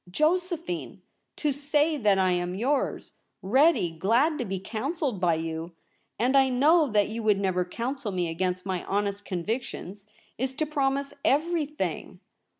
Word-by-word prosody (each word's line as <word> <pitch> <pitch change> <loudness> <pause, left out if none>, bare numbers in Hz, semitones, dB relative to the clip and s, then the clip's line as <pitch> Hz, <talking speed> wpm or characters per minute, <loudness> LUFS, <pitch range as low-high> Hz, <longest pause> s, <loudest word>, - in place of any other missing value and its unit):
Josephine 345 - -1
— - - -51
to 300 - 0
say 290 +3 +1
that 210 -8 +3
I 185 -1 +3
am 175 0 -1
yours 265 +8 -1 0.2
— - - -52 0.2
ready 295 - +4
— - - -22
glad 245 - +2
to 250 - -1
be 195 -1 -3
counselled 245 - -3
by 170 -2 +3
you, 160 +1 -4 0.4
and 250 +4 +2
I 270 -1 +5
know 300 +5 +4
that 210 -4 +2
you 225 +1 -4
would 210 -2 +3
never 185 -2 +1
counsel 235 +5 -4
me 180 -2 -1
against 180 +2 -2
my 185 -2 -2
honest 200 0 -1
convictions, 200 +1 -4 0.3
Is 260 +1 -2
to 310 - 0
promise 280 -1 -1
everything. 305 0 -1
230 Hz, 160 wpm, -27 LUFS, 190-290 Hz, 0.4 s, I